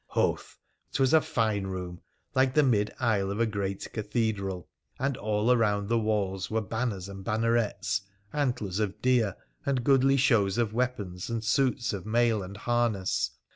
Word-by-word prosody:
Hoth! - - -1 0.4
'Twas 135 +1 +2
a 160 - +7
fine 110 -4 0
room, 90 -2 -5 0.3
like 130 0 +2
the 150 - +6
mid 105 -6 +2
aisle 105 -5 +1
of 100 +2 -3
a 115 - +4
great 100 -3 -3
cathedral, 105 -5 -2 0.3
and 135 +1 0
all 105 +1 +1
around 105 -4 +2
the 115 0 +3
walls 100 -3 -1
were 110 - +1
banners 110 -2 -3
and 100 -1 -8
bannerets, 110 -3 0 0.3
antlers 125 -10 -1
of 105 -1 -2
deer, 120 -6 +3 0.3
and 130 -3 0
goodly 135 +1 +4
shows 110 -7 +3
of 115 -3 0
weapons, 110 -8 -2
and 115 -1 -2
suits 125 -1 +1
of 100 0 -5
mail 115 -1 +2
and 95 +2 -8
harness. 115 -4 0
110 Hz, 160 wpm, -28 LUFS, 100-120 Hz, 0.4 s, a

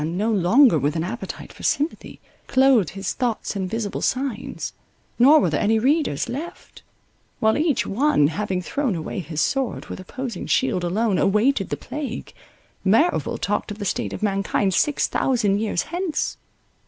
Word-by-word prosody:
Man, 165 +3 -2
no 215 +3 +1
longer 210 - +5
with 145 +3 0
an 160 - -1
appetite 230 +7 -6
for - - -14
sympathy, 300 +3 -2 0.3
clothed 260 - +4
his 195 -1 -2
thoughts 240 -4 -2
in 190 -2 -2
visible 215 +1 -3
signs; 260 -4 -2 0.5
nor 285 +6 +7
were - - +1
there - - 0
any 220 +1 +3
readers 260 - +1
left: 290 +8 -7 0.6
while 220 0 +3
each 305 -3 +1
one, 210 - +2
having 185 +1 -2
thrown 265 -1 -1
away 165 +5 -4
his 155 -2 -3
sword 270 -3 -1
with - - -6
opposing 235 +2 -6
shield 185 -9 +1
alone, 195 +2 +1
awaited 210 +8 +2
the - - -2
plague, 280 -5 -6 0.5
Merrival 230 - +2
talked - - -2
of 210 - -6
the 205 - -5
state - - -2
of - - -6
mankind 195 -1 0
six 290 +10 +2
thousand 210 -6 +1
years 210 -5 -1
hence. 345 -2 -2
220 Hz, 165 wpm, -23 LUFS, 190-270 Hz, 0.6 s, nor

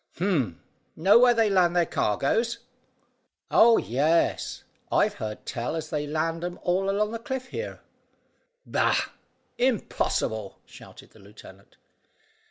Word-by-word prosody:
"Humph! 155 - 0 0.4
Know 195 +8 +5
where 245 -1 +5
they 225 -1 +3
land 180 -3 +3
their 175 -1 +3
cargoes?" 225 - 0 0.9
"Oh, 230 0 +6
yes; 150 +8 0 0.3
I've - - +2
heard 105 -1 -7
tell 120 +5 -3
as 160 -1 -5
they 150 -1 -2
land 165 +2 -2
'em 175 0 -4
all 190 +2 +1
along 210 +2 0
the 230 - -4
cliff 260 +1 -5
here." 475 - -6 0.8
"Bah! - - +1 0.5
Impossible," 145 - -1
shouted - - -15
the - - -19
lieutenant. 100 -1 -16
175 Hz, 125 wpm, -26 LUFS, 140-220 Hz, 0.9 s, Oh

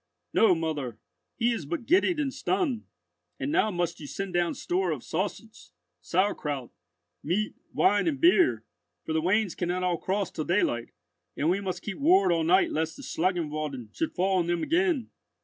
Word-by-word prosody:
"No, 210 -5 +5
mother, 150 -8 -3 0.4
he 235 0 +2
is 230 - -3
but 330 -8 -3
giddied 355 +1 +3
and 275 -3 -1
stunned, 320 - -1 0.5
and 285 - -2
now 215 -9 +3
must 175 -3 -2
you 150 - -8
send 195 +4 -5
down 175 -1 +1
store 180 +1 -1
of 150 -7 -3
sausage, 205 +6 -4 0.3
sourkraut, 150 - -1 0.5
meat, 210 +5 -1 0.2
wine, 205 -3 +3
and 145 -5 0
beer; 135 - +4 0.4
for 160 - -2
the 160 - +1
wains 190 +2 +2
cannot 180 +1 -2
all 175 -2 0
cross 195 0 -1
till 155 - -4
daylight, 145 - +1 0.5
and 155 +4 +2
we 195 +2 0
must 185 -2 -4
keep 210 - -5
ward 345 - +5
all 165 -1 +2
night 180 +4 +4
lest 160 +1 -2
the - - -10
Schlangenwalden 155 - -2
should 325 - -2
fall 190 +1 +2
on 170 - 0
them 175 -1 0
again. 335 - +1
180 Hz, 175 wpm, -28 LUFS, 160-215 Hz, 0.5 s, No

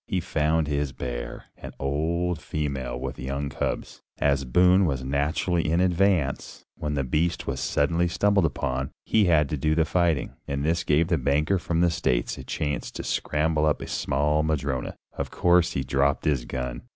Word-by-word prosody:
He 95 - 0
found 80 -1 +1
his 70 -2 -1
bear, - - -5
an - - -8
old 80 +4 -1
female 70 -5 -3
with 65 0 -5
young 70 +2 -3
cubs. - - -4 0.2
As 70 -1 +1
Boone 90 +8 +4
was 65 -3 -2
naturally 75 +5 0
in 85 - +2
advance 90 -5 +1
when 75 -1 -3
the 70 - 0
beast 75 +6 0
was 65 -1 -3
suddenly 85 +4 +1
stumbled 100 +2 +2
upon, 65 -2 -2 0.2
he 110 -2 +3
had 80 -4 +4
to 75 - -2
do 75 +3 +1
the 80 -1 +3
fighting, 85 -5 +1
and 70 +1 -2
this 85 +2 +1
gave 80 +1 +2
the 85 -4 +2
banker 75 +8 +1
from 85 -1 -1
the 85 -1 +4
States 65 -7 0
a - - -7
chance 75 -2 -3
to - - -7
scramble 75 0 0
up 75 - +1
a - - -6
small 75 +3 0
madrona. 70 -5 -2 0.2
Of - - -4
course 90 -1 +3
he 70 - -1
dropped 70 +1 +1
his 70 -5 +1
gun. 60 -1 -4
75 Hz, 180 wpm, -26 LUFS, 70-85 Hz, 0.2 s, Boone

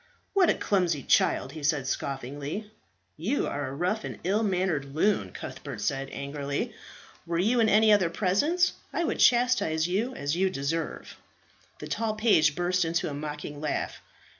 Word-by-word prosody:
"What 380 -3 +4
a - - +3
clumsy 175 -8 0
child!" 130 - +2
he 155 +1 -8
said 145 -2 +1
scoffingly. 140 - -4 0.5
"You 210 - 0
are 145 -1 -3
a 135 - -6
rough 185 +8 -1
and - - -6
ill 200 +5 +1
mannered 180 -9 -1
loon," 205 +6 +1
Cuthbert 140 -7 -7
said 135 +6 -2
angrily. 140 0 -3 0.5
"Were 170 0 -1
you 225 +8 +2
in 225 -1 +4
any 215 +1 +5
other 190 -5 +3
presence 255 - +2 0.2
I 340 - -1
would - - -1
chastise 240 -10 +3
you 220 +8 -1
as 145 +2 -2
you 190 +2 +2
deserve." 165 0 -3 0.6
The - - -8
tall 225 -1 -1
page 160 -9 +4
burst 180 +1 +1
into 165 0 -1
a - - -5
mocking 150 0 -6
laugh. 150 - -2
170 Hz, 165 wpm, -28 LUFS, 145-210 Hz, 0.6 s, any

